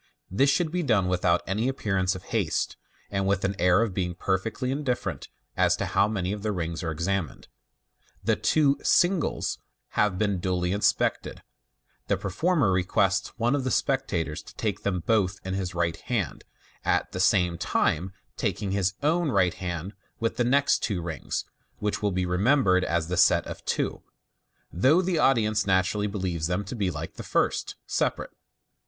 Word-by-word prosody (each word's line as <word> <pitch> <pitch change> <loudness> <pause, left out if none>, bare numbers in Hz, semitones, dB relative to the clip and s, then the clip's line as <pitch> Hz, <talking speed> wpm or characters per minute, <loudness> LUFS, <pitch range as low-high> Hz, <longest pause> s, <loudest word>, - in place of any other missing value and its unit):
This 135 +9 +3
should 160 +2 +1
be 180 +1 0
done 110 - +2
without 90 -1 +2
any 105 +6 -1
appearance 95 -8 0
of 90 - -8
haste, - - 0 0.4
and 100 -1 0
with 100 -1 +1
an 100 +1 -1
air 90 +5 +4
of 110 -5 -3
being 90 -2 -2
perfectly 100 +8 -1
indifferent 125 - -2 0.3
as - - +3
to - - -2
how 100 +1 +2
many 100 -4 -2
of 105 - -5
the 105 +1 -1
rings 85 -3 -3
are 85 - -2
ex 80 +1 -3
amined. 95 -5 -2 0.8
The - - +2
two 145 -3 +2
" - - -18 0.2
singles 175 -2 0 0.2
" - - -57
having 105 -3 +1
been 100 -2 0
duly 90 -1 -1
inspected, 100 +2 0 0.6
the - - +1
performer 145 - +1
request 95 +1 +1
sone 120 +2 +1
of 145 -2 0
the 130 - -1
spectators 90 - -1
to - - -15
take - - -2
them 90 -3 -1
both 95 -2 +1
in 95 - -3
his 95 -2 -3
right 85 -1 0
hand, - - -3 0.4
at - - +1
the 90 - -5
same 90 -4 +3
time 90 +5 0 0.3
taking 105 -2 -2
in - - 0
his 95 0 0
own 165 +2 +2
right 95 -7 +2
hand 90 +1 -5 0.3
the 115 +1 0
next 140 +4 +3
two 100 -5 -1
rings, 85 -2 -4 0.3
which, 105 0 -1
it - - -14
will 105 - +2
be 90 0 0
remembered, 95 +1 +3
are 85 0 +1
the 85 +2 -3
set 90 - +5
of - - -8
two, - - -1 0.7
though 130 - +4
the 175 -3 0
audience 110 -6 +2
naturally 95 +2 +2
believe 90 -6 -2
them 90 +3 -1
to 105 - -6
be, 100 -6 0
like 80 -1 -6
the - - -5
first, - - 0
separate. - - -1
95 Hz, 180 wpm, -26 LUFS, 90-115 Hz, 0.8 s, set